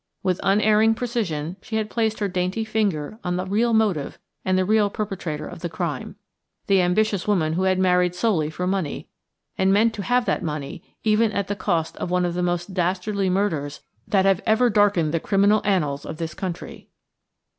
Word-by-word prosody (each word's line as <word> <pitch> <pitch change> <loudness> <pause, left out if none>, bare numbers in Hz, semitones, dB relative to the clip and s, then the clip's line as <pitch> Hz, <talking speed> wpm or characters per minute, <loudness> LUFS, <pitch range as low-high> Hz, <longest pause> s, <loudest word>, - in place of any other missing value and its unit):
With 185 -1 0
unerring 215 +2 +3
precision 190 -9 -3
she 220 - -6
had 220 -1 0
placed 220 0 -1
her 205 - -1
dainty 185 +4 -2
finger 215 -4 -1
on 180 -1 -1
the 185 +1 -2
real 220 +5 +1
motive 210 -10 +1 0.3
and 185 0 +1
the 185 - +2
real 210 0 +3
perpetrator 185 -8 -4
of - - -9
the 175 - -4
crime–the 195 +3 -3
ambitious 200 +2 +1
woman 165 -7 +1
who 185 +3 0
had 185 0 +2
married 180 -1 +2
solely 180 -7 +1
for 180 +3 -4
money, 185 -5 -2 0.5
and 190 0 +3
meant 220 +3 +3
to 205 - -5
have 245 +4 +1
that - - 0
money 150 -4 -5 0.2
even 215 0 +3
at 200 -1 -2
the 205 - -1
cost 170 -5 -1
of - - -4
one 180 0 +1
of 175 - -1
the 180 - -2
most 175 +1 -2
dastardly 185 +2 0
murders 165 -7 -1 0.3
that 195 -2 +2
have 195 0 +3
ever 230 +2 +4
darkened 200 -7 +3
the 165 - +1
criminal 200 +4 +3
annals 150 -8 0
of 160 - -7
this 165 -1 -4
country. 180 -3 -6
190 Hz, 190 wpm, -23 LUFS, 175-210 Hz, 0.5 s, ever